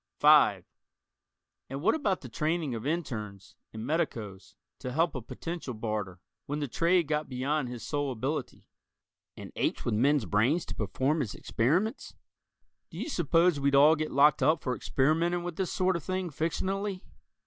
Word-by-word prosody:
(5) - - +5 1.0
And 135 +3 -5
what 215 - +4
about 210 - 0
the 130 - -8
training 155 +3 -1
of 115 +3 -4
internes 110 - -4 0.2
and 110 +1 -6
medicos 115 - -3 0.2
to 130 -2 -5
help 165 +4 +2
a 130 - -4
potential 160 +2 -6
Barter, 105 -4 -4 0.3
when 145 - -2
the 145 -1 -2
trade 170 +6 +2
got 150 0 -1
beyond 135 +1 -1
his 120 -2 -7
sole 145 -2 -1
ability 130 +3 -4 0.7
and - - -9
apes - - -1
with - - 0
men's 135 +3 +2
brains 120 - +2
to - - -6
perform 130 +9 0
his 115 -9 -3
experiments? 180 - -1 0.7
Do - - -11
you - - -4
suppose 170 - +2
we'd 140 0 +2
all 150 +3 +7
get 155 0 -3
locked 145 +2 +4
up 155 0 +3
for 125 -2 -1
experimenting 165 +8 +1
with 175 -2 -5
this 190 -2 -1
sort 185 0 +1
of 170 - -4
thing 185 0 -3
fictionally? 190 +5 -2
150 Hz, 165 wpm, -29 LUFS, 125-170 Hz, 1.0 s, all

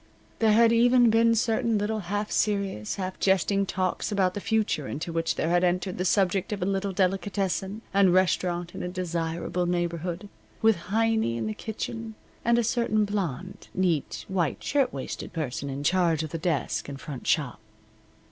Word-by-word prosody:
There 220 -2 +4
had 230 +1 +5
even 240 0 +5
been 230 +1 +4
certain 225 0 +1
little 215 +2 -1
half 205 +2 -3
serious, 200 - 0
half 185 -1 -5
jesting 195 +1 +2
talks 185 +3 -1
about 190 -3 +2
the 205 - -5
future 215 -11 0
into 165 +3 -4
which 165 0 0
there 160 - -1
had 175 +1 +3
entered 180 +1 0
the 185 - 0
subject 190 +1 +1
of 210 - -2
a - - 0
little 195 0 -1
delicatessen 195 +2 -1
and 195 -2 +5
restaurant 175 -1 +1
in - - -6
a - - -3
desirable 175 -1 -2
neighborhood, 175 +1 -2 0.3
with 220 -3 +4
Heiny 220 - +1
in 115 - -2
the 110 - -2
kitchen, 220 - -5 0.3
and 235 0 +3
a 240 - +3
certain 225 -2 +1
blonde, 185 -3 -4
neat, 175 -6 0
white 175 -6 -1
shirtwaisted 250 - -2
person 140 -4 -3
in 135 +1 -4
charge 170 -1 +2
of 155 - -6
the 165 - -3
desk 155 -5 -1
and 140 -1 -7
front 140 -3 -7
shop. 140 -9 +1
185 Hz, 170 wpm, -27 LUFS, 170-210 Hz, 0.3 s, had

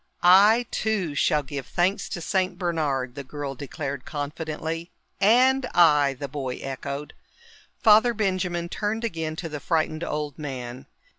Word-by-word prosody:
"I, 205 +7 +7
too, 205 -8 -1
shall 150 +1 +2
give 140 -1 -6
thanks 195 +2 0
to 175 - -5
Saint 185 +1 0
Bernard," 150 -8 -1
the 140 +1 -7
girl 140 0 -5
declared 140 0 -5
confidently. 160 +3 -4 0.3
"And 255 +5 +4
I," 150 -5 +5
the 140 +2 -5
boy 130 -2 -4
echoed. 140 +2 -6 0.7
Father 220 +2 +6
Benjamin 185 -4 -1
turned 215 +5 -2
again 160 -8 -3
to 165 - -5
the 150 -2 -5
frightened 160 0 -1
old 150 -1 -4
man. 130 -3 -6
160 Hz, 140 wpm, -25 LUFS, 140-190 Hz, 0.7 s, I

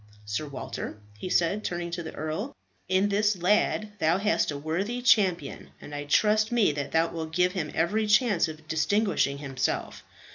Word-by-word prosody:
Sir 110 +9 -3
Walter," 135 -5 -6 0.2
he 105 - -6
said, 180 +5 +1
turning 175 -1 -3
to 175 0 -3
the 160 - -8
earl, 155 - -4 0.3
"in 190 +2 +3
this 205 0 +2
lad 210 +3 +1
thou 165 +2 +3
hast 205 +2 +1
a 145 - -3
worthy 180 +11 -2
champion, 190 - +2
and 145 - -11
I 145 0 -4
trust 215 +8 +3
me 235 -8 +3
that 140 -1 -4
thou 165 +1 +2
wilt 160 -1 -5
give 180 +1 +3
him 175 -5 -3
every 210 +7 +1
chance 210 -5 +3
of 155 0 -10
distinguishing 160 -3 +1
himself. 135 -2 -3
175 Hz, 175 wpm, -27 LUFS, 155-210 Hz, 0.3 s, in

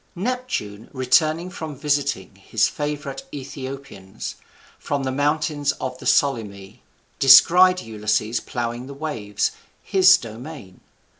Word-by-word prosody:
Neptune, 190 - -4
returning 155 +7 +2
from 160 -5 -6
visiting 140 -8 -1
his 105 +2 +1
favourite 145 -2 -4
Aethiopians, 135 -7 -7 0.5
from 140 -1 -2
the 130 - -1
mountains 145 +1 0
of 130 -1 -6
the - - -6
Solymi, 105 -8 0 0.4
descried 180 +7 +7
Ulysses 110 +1 -1
ploughing 120 +1 -4
the 140 - -9
waves, 120 -9 -2 0.3
his 185 -1 +6
domain. 115 - -10
135 Hz, 105 wpm, -22 LUFS, 115-150 Hz, 0.5 s, descried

